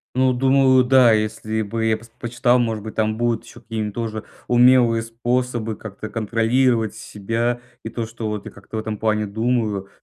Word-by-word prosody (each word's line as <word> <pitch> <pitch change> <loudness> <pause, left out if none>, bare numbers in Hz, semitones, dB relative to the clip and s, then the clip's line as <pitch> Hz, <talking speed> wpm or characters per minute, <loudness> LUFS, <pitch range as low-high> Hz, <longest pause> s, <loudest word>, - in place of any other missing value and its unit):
Ну, 130 0 +3
думаю, 130 0 +4
да, 125 -2 +5
если 110 0 -1
бы 115 +2 -3
я 110 -1 +2
пос 115 +1 -17
почитал, 120 +1 +2
может 110 -3 -1
быть 110 - -7
там 110 0 0
будут 120 -1 0
еще 120 - -14
какие-то 110 -2 -4
тоже 110 -1 -4 0.2
умелые 120 -2 +5
способы 120 0 -2
как-то 110 0 -8
контролировать 115 +1 +1
себя 115 +3 -3 0.2
и 110 - -5
то, 115 0 -4
что 115 0 -6
вот 105 -1 -5
я - - -8
как-то 100 +2 -9
в - - 0
этом 110 -1 -4
плане 110 -1 +1
думаю. 110 -2 -1
115 Hz, 180 wpm, -21 LUFS, 110-120 Hz, 0.2 s, да